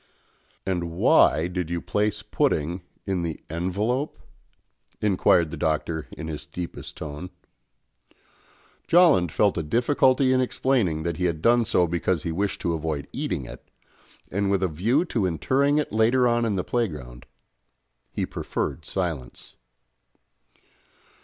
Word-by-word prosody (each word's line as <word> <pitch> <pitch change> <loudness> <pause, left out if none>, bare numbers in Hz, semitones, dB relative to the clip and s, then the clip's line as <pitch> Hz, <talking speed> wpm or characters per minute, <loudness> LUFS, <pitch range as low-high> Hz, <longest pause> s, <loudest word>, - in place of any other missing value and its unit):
"And 90 -3 -1
why 80 -1 +4
did 90 -2 -3
you 85 0 -1
place 105 +3 -1
pudding 90 - 0 0.2
in 95 -3 -1
the 85 -2 -3
envelope?" 105 - -1 0.8
inquired 90 -5 +3
the 85 - -5
Doctor 80 +1 -1
in 80 - -7
his 75 -2 -5
deepest 85 +3 -7
tone. 75 +4 -6 1.6
Jolland 160 - +5
felt 100 0 +2
a - - 0
difficulty 130 - +3
in 130 - +3
explaining 120 -11 0
that 85 -1 -2
he 90 - 0
had 85 -3 0
done 120 +5 +4
so 90 -5 +3
because 85 0 -1
he 85 - -2
wished 100 +4 -2
to 85 - 0
avoid 80 -3 -3
eating - - -3
it, - - -12 0.6
and 100 +1 0
with 100 -1 +1
a - - +3
view 110 - +1
to 110 - 0
interring 135 - +1
it 150 - -1
later 120 +3 +4
on 120 0 +2
in 105 -3 0
the 90 - -1
playground: 75 - -3 0.8
he - - -2
preferred - - -4
silence. 85 -9 -4
90 Hz, 140 wpm, -25 LUFS, 80-115 Hz, 1.6 s, Jolland